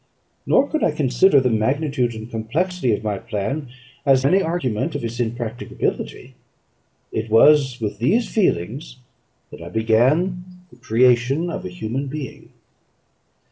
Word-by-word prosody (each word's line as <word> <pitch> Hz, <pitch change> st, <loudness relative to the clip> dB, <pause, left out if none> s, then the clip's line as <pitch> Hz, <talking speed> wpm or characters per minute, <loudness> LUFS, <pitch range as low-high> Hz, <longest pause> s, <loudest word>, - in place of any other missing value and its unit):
Nor 275 Hz, -, +4 dB
could 310 Hz, -, -2 dB
I -, -, +4 dB
consider 145 Hz, +2 st, +3 dB
the 125 Hz, -2 st, +1 dB
magnitude 125 Hz, +2 st, 0 dB
and 110 Hz, 0 st, -7 dB
complexity 130 Hz, +7 st, -1 dB
of -, -, -8 dB
my 105 Hz, -2 st, -2 dB
plan 115 Hz, +6 st, -3 dB, 0.4 s
as 135 Hz, -1 st, +3 dB
any 185 Hz, +7 st, +4 dB
argument 160 Hz, -, -2 dB
of -, -, -3 dB
its 115 Hz, +1 st, -5 dB
impracticability. 120 Hz, 0 st, -4 dB, 0.8 s
It 110 Hz, +1 st, -3 dB
was 135 Hz, +2 st, +5 dB
with 105 Hz, -3 st, -4 dB
these 210 Hz, -, +2 dB
feelings 130 Hz, -, -1 dB, 0.5 s
that -, -, -11 dB
I 85 Hz, -, -8 dB
began 130 Hz, -, +2 dB, 0.3 s
the 120 Hz, -, -18 dB
creation 125 Hz, +7 st, +2 dB
of -, -, -5 dB
a -, -, -4 dB
human 110 Hz, +10 st, -4 dB
being. 140 Hz, 0 st, -7 dB
125 Hz, 140 wpm, -21 LUFS, 110-150 Hz, 0.8 s, was